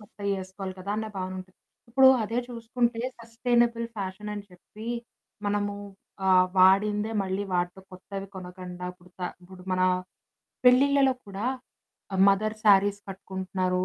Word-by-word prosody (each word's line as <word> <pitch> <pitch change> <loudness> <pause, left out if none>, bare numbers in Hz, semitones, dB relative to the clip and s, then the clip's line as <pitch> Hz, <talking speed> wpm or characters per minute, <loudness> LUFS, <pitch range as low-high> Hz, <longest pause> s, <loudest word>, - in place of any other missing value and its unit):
కొత్తయి 200 -1 -5
వేసుకోవాలి 190 0 -6
కదా 195 +2 -5
అన్న 220 0 -2
భావనుంటది. 185 0 -5 0.3
ఇప్పుడు 265 +2 +7
అదే 230 +3 -1
చూసుకుంటే 235 0 -1 0.2
సస్టెయినబుల్ 235 0 +1
ఫ్యాషన్ 200 +1 -4
అని 205 - -5
చెప్పి 210 +5 -12 0.6
మనము 205 0 0 0.5
ఆహ్, 185 -1 +6
వాడిందే 205 +3 +5
మళ్ళీ 190 +1 -2
వాడతాం. 180 +2 -1
కొత్తవి 195 +2 -7
కొనకుండా 180 -1 -8
ఇప్పుడు 180 0 -21
త - - -15 0.2
ఇప్పుడు 180 +1 -13
మన 185 - +1 0.8
పెళ్ళిళ్ళలో 270 +2 +6
కూడా 200 +3 -4 0.8
మదర్ 215 +2 +2
శారీస్ 200 0 +5
కట్టుకుంటున్నారు. 185 -1 -2
200 Hz, 120 wpm, -27 LUFS, 185-220 Hz, 0.8 s, ఇప్పుడు